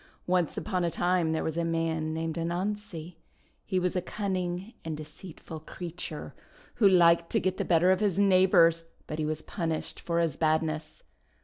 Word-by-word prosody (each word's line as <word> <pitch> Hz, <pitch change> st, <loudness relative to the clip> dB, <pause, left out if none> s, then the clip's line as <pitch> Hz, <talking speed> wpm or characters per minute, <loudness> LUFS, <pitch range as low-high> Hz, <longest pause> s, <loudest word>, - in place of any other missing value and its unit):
Once 180 Hz, -3 st, +1 dB
upon 185 Hz, -4 st, -1 dB
a 170 Hz, -, +2 dB
time 175 Hz, -1 st, +1 dB
there 160 Hz, -, -1 dB
was 160 Hz, 0 st, -2 dB
a 170 Hz, -, +1 dB
man 165 Hz, -1 st, -1 dB
named 160 Hz, 0 st, -2 dB
Anansi. 175 Hz, 0 st, -3 dB, 0.5 s
He 190 Hz, -2 st, 0 dB
was 180 Hz, 0 st, -1 dB
a 180 Hz, -, +1 dB
cunning 185 Hz, +1 st, -3 dB
and 160 Hz, -2 st, -4 dB
deceitful 155 Hz, +1 st, -9 dB
creature, 165 Hz, -1 st, -7 dB, 0.4 s
who 205 Hz, -4 st, +6 dB
liked 170 Hz, -2 st, +5 dB
to -, -, +4 dB
get 185 Hz, 0 st, -1 dB
the -, -, 0 dB
better 175 Hz, +1 st, +4 dB
of 190 Hz, -, +3 dB
his 205 Hz, -4 st, +1 dB
neighbours; 185 Hz, -4 st, +5 dB, 0.2 s
but 155 Hz, -, -5 dB
he 155 Hz, -, 0 dB
was 155 Hz, 0 st, -1 dB
punished 165 Hz, -3 st, -3 dB
for 170 Hz, -1 st, -1 dB
his 165 Hz, -4 st, 0 dB
badness. 155 Hz, 0 st, -1 dB
170 Hz, 175 wpm, -29 LUFS, 160-185 Hz, 0.5 s, who